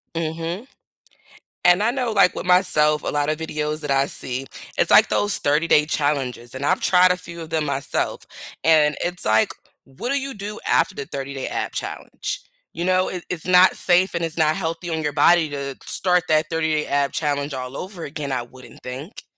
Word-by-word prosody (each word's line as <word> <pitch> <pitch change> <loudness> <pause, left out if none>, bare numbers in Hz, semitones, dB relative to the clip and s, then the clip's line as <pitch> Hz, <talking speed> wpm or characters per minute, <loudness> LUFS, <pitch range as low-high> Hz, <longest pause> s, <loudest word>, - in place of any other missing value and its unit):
Mhm. 165 +7 -4 1.0
And 180 +3 +5
I 230 - +2
know, 250 -3 -2
like, 195 -3 +4
with - - -5
myself, 155 -5 +4
a - - -5
lotta 145 +1 0
videos 155 -1 -3
that 145 - -3
I 135 0 +2
see, 130 -1 -2 0.3
it's, - - +2
like, - - +6
those 205 -1 +1
30 150 +3 +1
day 150 -2 +4
challenges 135 -5 -2
and 135 - -4
I've 185 +5 +1
tried 180 0 +5
a 180 - 0
few 170 -2 -10
of 160 - -8
them 160 -1 -1
myself 140 -1 -2 0.4
and 155 -2 +4
it's, 175 0 +1
like, 110 +1 +3 0.3
what 135 - -7
do 280 - +1
you 275 0 -5
do 210 +1 -7
after 190 - +2
the 140 - -5
30 140 0 -6
day 135 -1 -4
ab - - -3
challenge? - - -5 0.3
You 170 - -3
know, 185 0 +2
it 180 -2 -6
it's 175 -3 -5
not 180 0 +6
safe 180 +1 +2
and 170 - -1
it's 165 0 -3
not 155 -1 +3
healthy 165 +2 -4
on 160 -1 -2
your 150 - -1
body 160 +2 +4
to 140 -2 -5
start 180 -1 +1
that 155 0 +3
30 160 -1 0
day 155 -1 0
ab 140 -1 +1
challenge 145 -2 -2
all 130 0 -6
over 185 -3 -7
again, 145 -1 -5
I 125 -2 -1
wouldn't 130 +1 -15
think. 135 - -8
155 Hz, 205 wpm, -22 LUFS, 145-180 Hz, 1.0 s, like